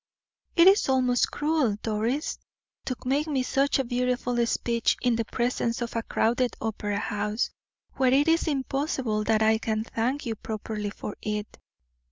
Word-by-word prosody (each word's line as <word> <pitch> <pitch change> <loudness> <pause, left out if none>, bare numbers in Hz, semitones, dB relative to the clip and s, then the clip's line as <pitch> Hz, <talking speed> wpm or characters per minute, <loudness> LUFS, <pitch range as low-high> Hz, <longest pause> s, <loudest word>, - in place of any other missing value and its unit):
"It 335 +1 +7
is 390 -6 +5
almost 255 -2 +3
cruel, 295 -8 +1
Doris, 225 +7 -1 0.5
to 255 - -2
make 280 +4 +1
me 275 -4 0
such 275 +2 +2
a 270 - +1
beautiful 245 0 0
speech 235 0 +1
in 245 -2 +2
the 230 0 -1
presence 235 0 -1
of 235 -1 -4
a 230 - +1
crowded 240 +3 0
opera 205 -2 -2
house, 210 +2 -1 0.5
where 260 -1 +3
it 280 +4 +4
is 330 +1 +3
impossible 270 -6 -1
that 220 -1 +3
I 220 0 +4
can 220 -1 -1
thank 250 +5 -2
you 230 - -1
properly 215 -1 -4
for 205 0 -7
it." 210 0 -4
240 Hz, 160 wpm, -27 LUFS, 220-270 Hz, 0.5 s, It